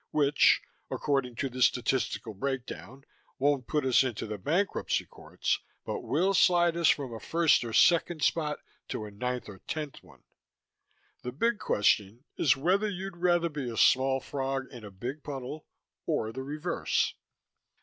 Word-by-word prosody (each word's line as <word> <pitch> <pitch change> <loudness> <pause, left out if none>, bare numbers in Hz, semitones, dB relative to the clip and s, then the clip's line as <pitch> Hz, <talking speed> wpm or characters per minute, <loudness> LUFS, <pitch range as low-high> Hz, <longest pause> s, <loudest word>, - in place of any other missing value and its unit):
Which 145 -1 +4 0.3
(according 135 -4 -1
to 135 - -1
the 130 0 -7
statistical 125 -2 +1
breakdown) 135 +3 -5 0.3
won't 140 -2 +1
put 150 -3 0
us 130 0 +5
into 120 -5 -3
the 105 -1 -5
bankruptcy 175 - 0
courts, - - -3 0.3
but 465 - -3
will 190 - +1
slide 175 -3 +4
us 170 -2 +3
from 135 -5 0
a 115 - -6
first 165 -2 +3
or 115 - -5
second 170 +3 +3
spot 150 -3 +1 0.3
to 110 - -4
a 105 - -9
ninth 125 +4 -3
or 100 -3 -10
tenth 150 -3 -5
one. - - -20 1.0
The 125 - -5
big 230 - 0
question 105 +3 +1
is 140 - +3
whether 190 +9 +2
you'd 190 -2 -6
rather 175 -1 +2
be 145 -6 -4
a 115 - -6
small 130 +3 +4
frog 135 0 -3
in 120 -3 -10
a 105 - -8
big 125 +10 -6
puddle 140 +1 -7 0.4
or 110 - 0
the 130 +3 -6
reverse. 150 +6 -1
135 Hz, 160 wpm, -29 LUFS, 125-165 Hz, 1.0 s, us